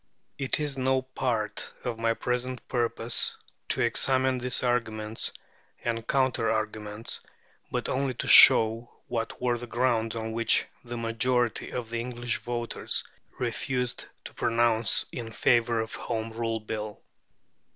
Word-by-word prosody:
It 135 +1 0
is 145 -3 -3
no 130 0 +2
part 120 -5 -2
of 120 -3 -3
my 115 0 +1
present 125 +1 -3
purpose 120 -1 0 0.3
to - - +1
examine 130 +2 +2
these 125 +1 +1
arguments 110 -3 -1 0.5
and 115 -1 -2
counter 130 -4 +1
arguments, 110 0 -3 0.5
but - - -2
only 135 -1 -1
to - - -4
show 115 -2 +8
what 115 -2 -3
were 120 -1 0
the 120 - -7
grounds 120 -2 0
on 110 -1 -3
which 115 0 +2 0.2
a 120 - -4
majority 115 +1 0
of 120 -2 -5
the 115 - -1
English 120 -1 -3
voters 120 -1 -2 0.3
refused 125 0 -2 0.2
to - - -9
pronounce 115 -1 +3
in 115 -2 -6
favour 115 +1 +2
of 110 0 -3
the - - -6
Home 115 -1 -3
Rule 115 0 -2
Bill. 110 -1 -5
120 Hz, 140 wpm, -28 LUFS, 115-125 Hz, 0.5 s, show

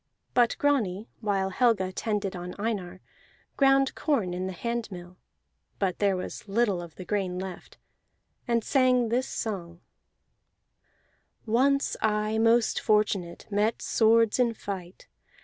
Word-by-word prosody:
But 240 -2 +3
Grani, 225 -8 0
while 195 -3 0
Helga 205 -4 +2
tended 205 -1 -2
on 180 0 -6
Einar, 195 -4 -3 0.5
ground 270 -1 +4
corn 225 - 0
in 185 +1 -3
the - - -3
handmill 185 -4 -5 0.6
(but 190 -3 -1
there 200 -2 +2
was 185 - -7
little 200 -3 +1
of 170 -3 -10
the 185 - -9
grain 190 -3 -1
left) 185 -1 -7 0.7
and 235 -2 +1
sang 255 -3 +3
this 250 +3 0
song: 175 -6 -5 1.7
"Once 270 +5 +2
I, 215 0 +1
most 230 +1 +3
fortunate, 205 -5 0
Met 210 +3 +1
swords 225 0 +3
in 235 -2 +2
fight. 185 -4 -7
210 Hz, 125 wpm, -27 LUFS, 185-235 Hz, 1.7 s, ground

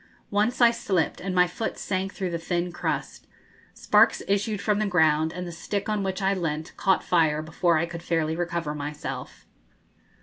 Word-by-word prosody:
Once 215 +5 +1
I 235 -1 +8
slipped, 195 -7 -1
and 185 0 -3
my 180 0 +6
foot 180 +6 -4
sank 190 0 -2
through 185 -3 -3
the 170 - -2
thin 175 +1 -2
crust. 175 - -4 0.5
Sparks - - +4
issued 205 +1 0
from 210 0 +1
the 215 - +1
ground, 160 -3 +3
and 180 +1 -5
the 175 - -6
stick 195 +4 -4
on 210 -1 0
which 190 0 -2
I 195 +1 +3
leant 160 -4 -3
caught 190 -1 +2
fire 155 -3 +2
before 165 +1 +1
I 160 - +1
could 170 -1 -7
fairly 160 -2 0
recover 170 -3 -2
myself. 150 0 -6
175 Hz, 180 wpm, -26 LUFS, 160-195 Hz, 0.5 s, I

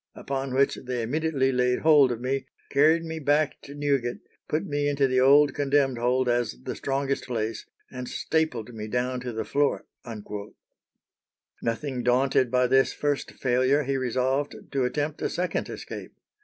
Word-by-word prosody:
upon 135 -1 -4
which 135 +2 +2
they 125 -2 -2
immediately 140 +1 0
laid 125 -1 +2
hold 150 -5 +6
of 120 - -3
me, 130 +2 -2 0.2
carried 155 +4 +4
me 160 -1 -5
back 145 0 +1
to 140 - -11
Newgate, 140 -4 -1 0.3
put 155 - -1
me 145 0 0
into 140 -1 +2
the 130 0 +2
old 140 +2 +6
condemned 140 -3 +1
hold 125 +2 +1
as 120 - 0
the - - -4
strongest 140 0 -2
place, 115 -3 -3 0.2
and 125 -1 -6
stapled 125 -8 -1
me 110 -1 -6
down 125 +3 -1
to 125 -1 -5
the 110 -1 -4
floor." 145 0 0 1.8
Nothing 125 +2 -2
daunted 130 +1 +2
by 125 +1 +3
this 135 +1 +3
first 145 -1 -2
failure, 130 +3 +2
he 135 0 -1
resolved 130 +2 0 0.2
to 135 -2 +1
attempt 145 +4 -2
a - - 0
second 180 -1 -2
escape. - - -8
135 Hz, 160 wpm, -26 LUFS, 125-145 Hz, 1.8 s, hold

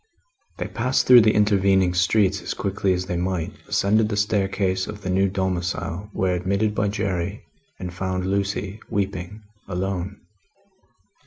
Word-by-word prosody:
They - - -3
passed 125 +3 0
through 125 -1 +9
the 110 0 +3
intervening 95 -3 +3
streets 95 +2 +2
as - - -4
quickly 100 -1 -1
as 90 0 -2
they 90 -2 -2
might, 90 -2 -2
ascended 105 +2 +2
the 105 - -2
staircase 95 -2 0
of 105 -1 -8
the 95 - -2
new 95 +1 +2
domicile, 95 0 -2
were 95 -2 0
admitted 100 +4 0
by 105 0 0
Jerry, 100 -4 -2 0.3
and 90 -1 -6
found 90 0 -2
Lucie 100 +1 -2
weeping, 100 0 -3 0.2
alone. 95 +1 -3
95 Hz, 145 wpm, -23 LUFS, 90-105 Hz, 0.3 s, through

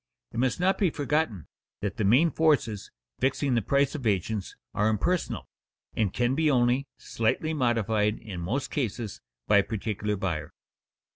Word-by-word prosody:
It 115 - -4
must 130 +6 +1
not 190 +2 +2
be 195 -4 +3
forgotten 145 - -1 0.4
that 100 -1 -3
the 110 - 0
main 130 +12 +5
forces 140 -11 +1 0.3
fixing 135 +1 +1
the 120 - +2
prices 140 +6 +2
of 125 -6 -3
agents 100 0 -1 0.2
are 105 +1 +2
impersonal, 155 - -1 0.5
and 105 -4 +1
can 120 +1 +1
be 155 +2 +2
only 125 +1 +2
slightly 115 +8 -1
modified 115 -5 +1
in 95 -5 -7
most 120 +11 -2
cases 115 -5 -3 0.3
by 105 - +5
a 100 - +5
particular 105 0 -2
buyer. 90 -6 -3
115 Hz, 155 wpm, -27 LUFS, 105-140 Hz, 0.5 s, main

